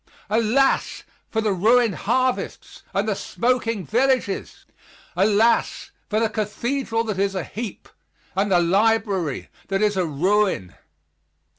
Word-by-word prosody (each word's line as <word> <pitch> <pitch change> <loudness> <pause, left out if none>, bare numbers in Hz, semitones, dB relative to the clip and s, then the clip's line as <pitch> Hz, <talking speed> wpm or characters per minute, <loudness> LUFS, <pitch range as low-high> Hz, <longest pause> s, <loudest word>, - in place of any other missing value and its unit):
Alas! 230 +5 +2 0.3
for 220 - -1
the 215 -2 +1
ruined 225 +4 +3
harvests 255 +7 -2
and - - -1
the - - +1
smoking 230 -5 -1
villages! 250 - 0 0.5
Alas, 215 +5 +2 0.2
for 215 - +1
the 225 - +2
Cathedral 230 +3 -2
that 215 -4 -3
is 195 0 0
a 185 - -2
heap, 220 -3 -7 0.5
and 195 +1 0
the 180 - +5
library 195 - +1 0.2
that 195 +1 0
is 210 -1 +2
a 185 -2 +1
ruin. 180 - +1
215 Hz, 125 wpm, -23 LUFS, 195-230 Hz, 0.5 s, the